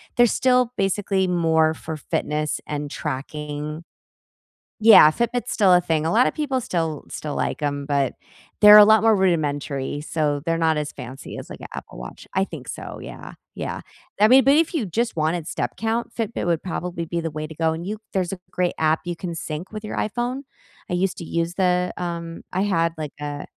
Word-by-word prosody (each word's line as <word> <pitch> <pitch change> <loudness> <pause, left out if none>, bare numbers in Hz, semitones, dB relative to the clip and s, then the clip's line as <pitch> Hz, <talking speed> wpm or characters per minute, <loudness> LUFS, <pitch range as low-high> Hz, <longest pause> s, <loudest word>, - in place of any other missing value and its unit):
they're 240 - +6
still 250 0 +2
basically 195 -1 +1
more 160 -3 +2
for 160 0 -6
fitness 150 0 -2
and 150 -1 -4
tracking. 150 +2 -5 1.0
Yeah, 215 -8 +9
Fitbit's 235 +6 -2
still 195 -4 +4
a 180 - +6
thing, 160 -3 0
a 165 - +1
lotta 245 +3 +4
people 280 -4 -1
still 165 - -2
still 150 -1 -5
like - - -2
'em, 145 -1 -2
but 140 -3 0 0.5
they're 210 0 +10
a 210 - +11
lot 220 +1 +5
more 225 -1 +5
rudimentary, 145 -6 0
so 150 -2 -1
they're 165 0 +1
not 160 -1 +2
as 150 0 -3
fancy 130 0 -9
as, - - -9
like, - - -9
a - - -7
Apple - - -9
Watch. - - -9
I 190 - +2
think 155 -9 -9
so, - - -7
yeah, - - -9 0.2
yeah. - - -4 0.4
I 210 - +7
mean, 260 +2 +7
but 275 - +6
if 330 0 +2
you 270 -10 0
just 225 +5 -1
wanted 160 +1 0
step - - -3
count, 225 +2 -2
Fitbit 225 -4 -3
would 170 -2 +1
probably 180 -2 -4
be 170 +1 -2
the 165 0 -3
way 155 0 -5
to 160 - -10
go, 160 +1 +1
and 170 +2 -6
you 210 +2 -4 0.2
there's 185 -2 0
a 195 - -4
great 180 -1 0
app 160 0 +2
you 175 - -3
can 170 0 -5
sync 160 +2 -6
with 215 0 -7
your 215 - -5
iPhone. 245 +5 -2 0.5
I - - 0
used 185 +1 0
to 170 - -6
use 170 +1 -2
the, 180 -1 +1
um 170 -1 -5
I 185 - 0
had, 170 -5 +1
like, 150 -2 -5
a 145 0 -5
170 Hz, 205 wpm, -23 LUFS, 155-205 Hz, 1.0 s, a